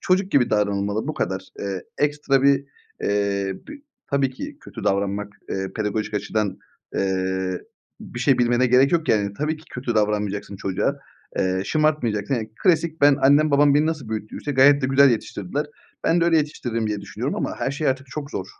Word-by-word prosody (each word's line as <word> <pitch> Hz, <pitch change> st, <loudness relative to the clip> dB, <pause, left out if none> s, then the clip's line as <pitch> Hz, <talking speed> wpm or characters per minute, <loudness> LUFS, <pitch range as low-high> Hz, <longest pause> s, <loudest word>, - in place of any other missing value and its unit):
çocuk 185 Hz, +1 st, +1 dB
gibi 130 Hz, -8 st, +3 dB
davranılmalı, 105 Hz, +2 st, 0 dB
bu 155 Hz, -, -2 dB
kadar. 95 Hz, +1 st, -2 dB, 0.2 s
Eee, 95 Hz, -2 st, -3 dB, 0.2 s
ekstra 145 Hz, -2 st, +1 dB
bir, 140 Hz, 0 st, +4 dB, 0.4 s
eee, 100 Hz, -1 st, 0 dB
b -, -, -7 dB, 0.4 s
tabii 140 Hz, -1 st, +2 dB
ki 130 Hz, -, -8 dB
kötü -, -, -9 dB
davranmak, 100 Hz, +1 st, 0 dB, 0.2 s
eee, 95 Hz, 0 st, -3 dB
pedagojik 110 Hz, 0 st, -2 dB
açıdan, 105 Hz, -2 st, -1 dB, 0.4 s
eee, 95 Hz, -1 st, -1 dB, 0.4 s
bir 120 Hz, -, -8 dB
şey 130 Hz, 0 st, +3 dB
bilmene 120 Hz, +1 st, +3 dB
gerek 130 Hz, +4 st, +4 dB
yok 165 Hz, -2 st, +1 dB
yani. 100 Hz, -2 st, +2 dB
Tabii 155 Hz, +2 st, -1 dB
ki 155 Hz, -, -17 dB
kötü 125 Hz, -2 st, -3 dB
davranmayacaksın 105 Hz, -2 st, -1 dB
çocuğa, 95 Hz, -1 st, -1 dB, 0.4 s
eee, 95 Hz, 0 st, +1 dB
şımartmayacaksın. 135 Hz, -7 st, +1 dB
Ya, 120 Hz, -, -1 dB, 0.2 s
klasik 165 Hz, -2 st, +2 dB
ben, 145 Hz, -1 st, +6 dB
annem, 145 Hz, +3 st, +5 dB
babam 145 Hz, 0 st, +5 dB
beni 150 Hz, +1 st, +3 dB
nasıl 155 Hz, -7 st, -3 dB
büyüttüyse 110 Hz, +6 st, -4 dB
gayet 140 Hz, +2 st, +5 dB
de -, -, +2 dB
güzel 135 Hz, +1 st, +6 dB
yetiştirdiler. 115 Hz, +4 st, -2 dB, 0.4 s
Ben 170 Hz, +1 st, +3 dB
de 170 Hz, -, +3 dB
öyle 170 Hz, -1 st, +4 dB
yetiştiririm 120 Hz, -7 st, -1 dB
diye 105 Hz, -1 st, -2 dB
düşünüyorum 100 Hz, -, -4 dB
ama -, -, -2 dB
her -, -, -1 dB
şey 145 Hz, +2 st, -1 dB
artık 135 Hz, +1 st, -1 dB
çok 145 Hz, +3 st, -6 dB
zor. 95 Hz, -, -4 dB
120 Hz, 180 wpm, -23 LUFS, 100-145 Hz, 0.4 s, ben